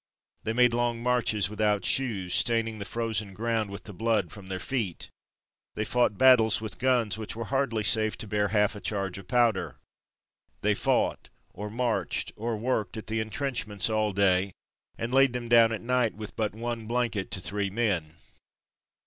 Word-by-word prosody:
They 110 - -2
made 125 0 +4
long 120 -1 0
marches 120 -5 +2
without 105 0 0
shoes, 100 -9 +1
staining 115 +1 +1
the 100 - -5
frozen 110 -3 -2
ground 115 0 -1
with 100 - -7
the 105 - -8
blood 105 -2 0
from 100 -3 -11
their 95 -1 -4
feet. 110 -7 -3 0.6
They 110 - -2
fought 120 -3 +1
battles 125 -4 +6
with 110 0 -5
guns 120 -4 +2
which 110 - -5
were 115 - -4
hardly 120 -5 0
safe 110 0 +2
to 110 - -6
bear 105 0 +1
half 105 0 +1
a 105 - -8
charge 100 -3 -2
of 95 - -13
powder. 115 -3 +1 0.8
They - - +3
fought, - - 0 0.2
or 105 +2 -6
marched, 110 -6 -1
or 115 +1 -3
worked 115 -1 -2
at 110 - -6
the 110 0 -2
intrenchments 110 -2 -2
all 110 -1 +1
day, 95 -1 +2 0.4
and 115 +2 -4
laid 135 -1 +5
them 120 -1 -4
down 115 -1 +6
at 110 - -3
night 125 -2 +1
with 105 0 -8
but 110 -2 -2
one 115 -1 -4
blanket 115 -4 -1
to - - -2
three 100 +1 -2
men. 95 -8 -1
110 Hz, 175 wpm, -27 LUFS, 100-120 Hz, 0.8 s, battles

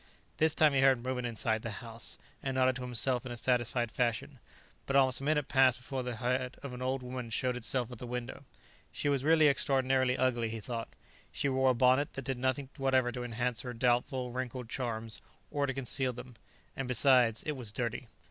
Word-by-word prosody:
This 160 0 +2
time 155 -2 +5
he 135 - +3
heard 135 -3 +4
movement 125 -1 -2
inside 110 -1 0
the 115 - -5
house, 115 -1 -3 0.2
and 135 -1 -3
nodded 130 -1 +3
to - - -7
himself 125 +1 0
in 130 - -7
a 120 - -5
satisfied 120 -1 +1
fashion. 125 +2 -1 0.5
But 135 - -1
almost 130 -1 +4
a - - -6
minute 150 -1 +1
passed 130 -2 +4
before 130 +1 -5
the 125 -1 -4
head 125 +2 -2
of 140 -3 -6
an 125 - -7
old 130 0 -1
woman 125 -1 -5
showed 125 +2 -1
itself 125 0 -1
at 120 - -9
the 125 - -7
window. 125 +3 -5 0.5
She 145 - -1
was 140 -2 +1
really 155 0 +5
extraordinarily 130 -2 +2
ugly, 120 -3 +1
he 115 0 -5
thought. 115 +1 -5 0.4
She 140 - -1
wore 130 0 +3
a 130 - +3
bonnet 130 +4 +3
that 135 - -6
did 135 -2 -3
nothing 130 +1 -1
whatever 130 -3 +2
to 125 0 -5
enhance 120 0 -1
her 125 -1 -6
doubtful, 125 +2 0
wrinkled 125 -1 -5
charms, 115 -3 -4 0.3
or 145 -1 0
to 135 - -1
conceal 130 0 0
them; 125 +1 -10 0.4
and 135 - -3
besides, 125 -2 +4
it 155 - -2
was 125 -7 -5
dirty. 120 +2 -3
125 Hz, 205 wpm, -31 LUFS, 120-135 Hz, 0.5 s, time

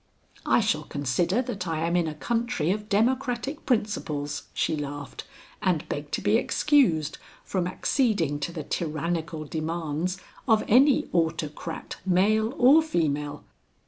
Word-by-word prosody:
"I - - +4
shall 200 -8 +1
consider 170 - 0
that 200 -7 -5
I 160 -1 -1
am 170 +1 0
in 175 -2 +2
a 155 - -4
country 230 -3 -1
of 210 +1 -3
democratic 250 +5 0
principles," 155 - -1
she 160 - 0
laughed, 145 -1 -6 0.4
"and - - 0
beg - - -4
to - - 0
be - - +3
excused 175 - +2 0.2
from 180 -2 -1
acceding 185 - 0
to 145 +4 -3
the 160 -3 -5
tyrannical 160 0 -3
demands 160 +3 -2 0.3
of 220 -2 +4
any 265 +5 +5
autocrat 160 -1 -2
male 215 +6 +2
or 275 +5 +7
female." 150 - -1
175 Hz, 135 wpm, -26 LUFS, 155-225 Hz, 0.4 s, or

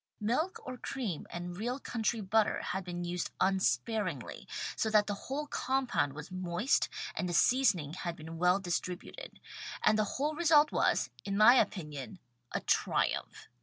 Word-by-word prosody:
Milk 255 - 0
or 255 -1 -6
cream 230 - -4
and 175 0 -5
real 245 +6 -2
country 230 -3 -1
butter 210 +2 +2
had 190 - -3
been 175 -1 -5
used 175 0 -2
unsparingly, 190 - 0 0.3
so 220 - 0
that 210 -1 +4
the 205 - -2 0.2
whole 290 +3 -2
compound 255 - 0
was 150 +4 -9
moist 185 +6 +1 0.2
and 180 - -2
the - - -2
seasoning 190 - +3
had 175 -1 -4
^ - - -23
been 160 +1 -8
well 180 +2 +4
distributed, 180 - -4 0.4
and 215 0 +4
the - - +4
whole 295 +3 0
result 305 -2 +5
was, 125 +1 +1
in 195 +4 -2
my 215 +3 +9
opinion, 155 - -1 0.3
a - - -2
triumph. - - 0
200 Hz, 160 wpm, -32 LUFS, 175-245 Hz, 0.4 s, my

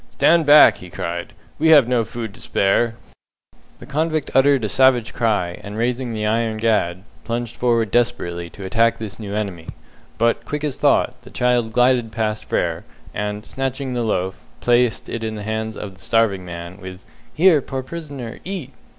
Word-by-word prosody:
"Stand 165 -2 +3
back!" 150 +1 +8
he 90 - -11
cried. 85 0 -5 0.3
"We 160 - +3
have 145 -6 +7
no 125 -2 +2
food 115 -1 -6
to - - -12
spare!" 110 +4 +1 0.8
The - - -12
convict 155 +2 -1
uttered 135 -1 +4
a - - +1
savage 130 0 +3
cry, 105 -7 -1
and 105 +1 -7
raising 120 +1 -1
the 110 -1 -3
iron 110 0 0
gad, 100 -5 0 0.2
plunged 120 0 -4
forward 115 -4 +1
desperately 85 -8 0
to 95 - -10
attack 115 +4 +2
this 110 -1 -7
new 105 -2 -5
enemy; 95 -6 -4 0.5
but, 115 0 +1
quick 150 0 -4
as 145 -3 -1
thought, 135 -3 +1
the - - -14
child 125 -2 +1
glided 125 -1 +2
past 110 -1 -2
Frere, - - -1 0.3
and, 105 +1 -4
snatching 135 0 -3
the 120 - -1
loaf, 95 -4 -2 0.2
placed 120 -1 +2
it 115 - -5
in 110 -1 -3
the 105 - -6
hands 110 +1 -3
of 100 -2 -7
the 95 - -18
starving 110 -5 +2
man, 85 +1 -8
with 95 -1 -8 0.3
"Here, 165 -2 +4
poor 130 0 -5
prisoner, 140 -6 -7
eat!" 175 -9 -6
115 Hz, 175 wpm, -21 LUFS, 105-130 Hz, 0.8 s, back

